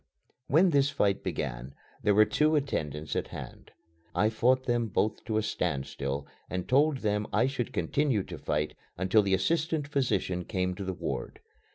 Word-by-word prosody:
When 170 +5 +5
this 140 -1 +4
fight 105 -9 +1
began, 65 +2 -4 0.3
there 105 -2 +3
were 110 +1 +7
two 155 +7 +2
attendants 75 - -2
at - - -1
hand. - - -9 0.5
I 110 +1 +3
fought 130 +4 +3
them 120 -1 +1
both 105 +1 0
to 110 -2 -1
a 110 - +1
standstill, 70 -5 -2 0.2
and 90 -1 -3
told 145 +2 +4
them 105 -3 -1
I 105 +4 +3
should 130 -3 -2
continue 140 -8 +1
to - - -8
fight 75 +1 -1 0.2
until 95 +4 +4
the 95 -1 +2
assistant 155 - 0
physician 125 -10 0
came 90 -1 -1
to 100 +2 -6
the 95 0 -2
ward. - - -4
110 Hz, 170 wpm, -29 LUFS, 90-135 Hz, 0.5 s, were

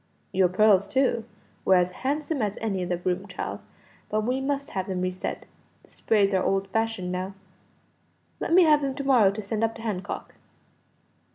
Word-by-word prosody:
"Your 185 -1 +3
pearls, 200 +1 +4
too, 250 -4 +1 0.4
were 190 - +5
as 180 0 +3
handsome 285 - -2
as 205 -1 -1
any 200 -4 -2
in 180 - -3
the 175 - 0
room, 185 +2 -2
child 185 - -5 0.5
but 215 0 +1
we 250 +4 -1
must 280 0 -2
have 190 -1 -3
them 185 -2 -2
re 185 0 0
set; 185 - -5 0.4
the - - -22
sprays 205 -3 +2
are 190 - +3
old 195 0 0
fashioned 225 -3 -1
now. 185 +2 -4 1.0
Let - - -3
me 360 +2 +7
have 305 -2 +5
them 270 -2 -2
to 280 - -4
morrow 250 -7 +5
to 205 +2 -4
send 215 +2 -2
up 225 0 0
to 225 - -10
Hancock." 200 -5 -4
210 Hz, 190 wpm, -26 LUFS, 185-255 Hz, 1.0 s, me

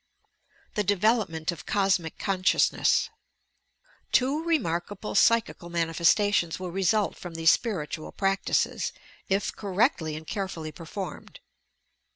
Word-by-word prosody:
THE 210 - 0
DEVELOPMENT 200 -5 +1
OP 170 - -9
COSMIC 190 -5 +1
CONSCIOUSNESS 190 -2 +2 1.0
Two 275 +5 +2
remarkable 205 - -1
psychical 220 -5 +2
manifestations 170 +2 +2
will 180 -1 -5
result 195 +3 +1
from 175 -2 -9
these 165 0 +5
spiritual 160 -9 -2
practices, 195 0 0 0.4
if 195 +1 0
correctly 190 - 0
and 155 +1 -8
carefully 180 -5 -4
performed. 170 +2 -8
190 Hz, 100 wpm, -27 LUFS, 165-205 Hz, 1.0 s, these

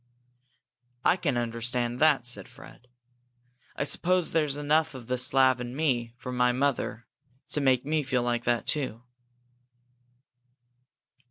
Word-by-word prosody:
"I - - +5
can 145 -9 -1
understand 120 +1 -2
that," 150 -5 +4
said 105 -6 -3
Fred. 125 - -15 0.9
"I - - -1
suppose 180 +4 +1
there's 150 -3 0
enough 150 0 +1
of 125 -3 -9
the 125 +2 -1
Slav 130 0 +3
in 120 +1 -6
me, 120 -6 0
from 125 0 -6
my 125 0 +3
mother, 125 -2 -1 0.4
to 150 - 0
make 130 -2 +2
me 155 +1 +1
feel 130 -3 0
like 120 -1 -1
that, 120 -1 +1
too." 130 -6 -2
130 Hz, 135 wpm, -28 LUFS, 120-145 Hz, 0.9 s, I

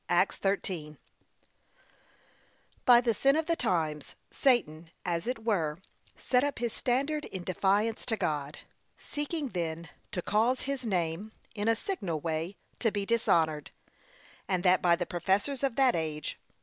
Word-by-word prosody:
(Acts - - +3
13) 180 -6 -2 1.9
By 240 -1 +8
the 235 -2 +2
sin 275 +5 +3
of 320 0 +1
the 335 - +1
times, 160 - -1 0.2
Satan, 170 - +1 0.2
as 170 +2 -1
it 245 -3 -3
were, 165 -9 +1 0.4
set 250 0 +2
up 285 0 -1
his 235 -1 -2
standard 280 +5 0
in 185 -2 -6
defiance 200 +5 +1
to 225 - +2
God; 150 -4 -2 0.4
seeking 295 -1 -3
then 165 -4 -3 0.2
to 180 - -3
cause 230 +5 +2
his 270 -3 -3
name, 180 +2 -1 0.2
in 210 -1 -2
a 230 - +4
signal 200 - -3
way, 165 +4 -3 0.2
to 225 - +2
be 205 -1 -2
dishonoured, 160 -9 +2 0.8
and 185 -2 0
that 185 0 +5
by 170 -1 +5
the 175 0 -2
professors 195 - 0
of 270 -4 0
that 265 -2 +4
age. 155 -2 -3
200 Hz, 150 wpm, -30 LUFS, 165-245 Hz, 1.9 s, By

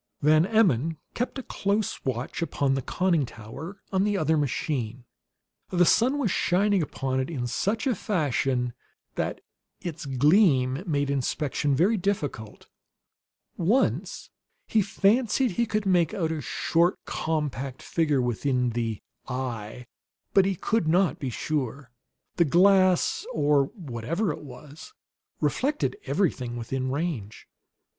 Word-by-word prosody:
Van 155 +3 +5
Emmon 165 - +2 0.2
kept 245 +3 -3
a 265 - -5
close 200 -1 -1
watch 125 +4 -3
upon 140 -4 0
the 135 - 0
conning 170 +2 +1
tower 135 - -9
on 190 0 +3
the 205 -1 +1
other 160 -2 +2
machine. 130 -4 -2 0.6
The 180 -1 +3
sun 255 +10 +3
was 245 -10 0
shining 195 +2 +2
upon 135 -3 -2
it 130 - -2
in 135 -7 -3
such 205 - -1
a 260 - +2
fashion 135 - 0 0.4
that - - -3 0.4
its 160 -4 -6
gleam 140 - +3
made 145 -3 0
inspection 140 +1 0
very 195 - +3
difficult. 145 - -3 0.9
Once 210 +10 0 0.3
he 220 - +2
fancied 220 +5 +2
that 180 - -8
he 235 0 +2
could 215 -1 -1
make 175 -4 +2
out 165 -4 -1
a 160 -2 -3
short, 170 +6 +1
compact 140 -5 -3
figure 150 -6 +1
within 125 +1 0
the 115 -2 -3 0.2
"eye"; 125 -3 -5 0.5
but 195 -1 +5
he 195 0 0
could 210 0 0
not 175 -2 +2
be 135 - -3
sure. 135 -1 -3 0.5
The 170 - +4
glass, 185 +3 +4
or 145 -2 +3
whatever 165 - -3
it - - -7
was, 150 - -12 0.4
reflected 290 +8 0
everything 130 -11 0
within 130 +3 -3
range. 135 - -4
155 Hz, 135 wpm, -26 LUFS, 130-195 Hz, 0.9 s, Van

